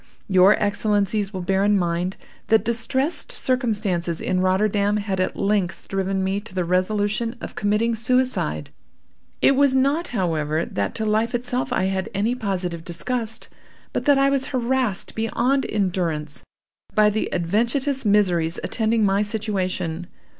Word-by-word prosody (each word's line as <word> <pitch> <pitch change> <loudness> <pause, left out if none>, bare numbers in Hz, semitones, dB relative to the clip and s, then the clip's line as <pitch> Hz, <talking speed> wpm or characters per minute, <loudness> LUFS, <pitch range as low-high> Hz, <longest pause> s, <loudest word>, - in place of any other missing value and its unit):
Your 190 +1 +6
Excellencies 205 -1 0
will 185 -3 -5
bear 195 +2 +1
in 205 0 +4
mind 175 +1 -1 0.3
that 220 0 +3
distressed 265 - -1
circumstances 215 - -1
in 185 -1 0
Rotterdam 200 +2 +2
had 200 -2 -2
at 185 - 0
length 195 -3 -1
driven 195 0 -1
me 190 +1 0
to 205 -2 -11
the 180 -2 0
resolution 205 +6 0
of - - -7
committing 210 +3 +1
suicide. 235 - 0 0.7
It 275 - +6
was 275 -1 +3
not, 280 +6 +2
however, 160 -6 -1
that 100 -1 -3
to 220 - -2
life 220 +2 +1
itself 250 +1 -2
I 190 - +1
had 190 0 -1
any 210 +5 +1
positive 185 -7 -3
disgust, 225 +6 -2 0.5
but - - -2
that 285 -2 +5
I 275 0 +3
was 275 -1 0
harassed 250 -5 0
beyond 245 +4 0
endurance 175 -7 -1 0.5
by 210 -1 +5
the 215 - -2
adventitious 235 - 0
miseries 180 -6 +2
attending 220 -1 +1
my 195 +1 +2
situation. 185 -5 -2
205 Hz, 145 wpm, -23 LUFS, 185-235 Hz, 0.7 s, Your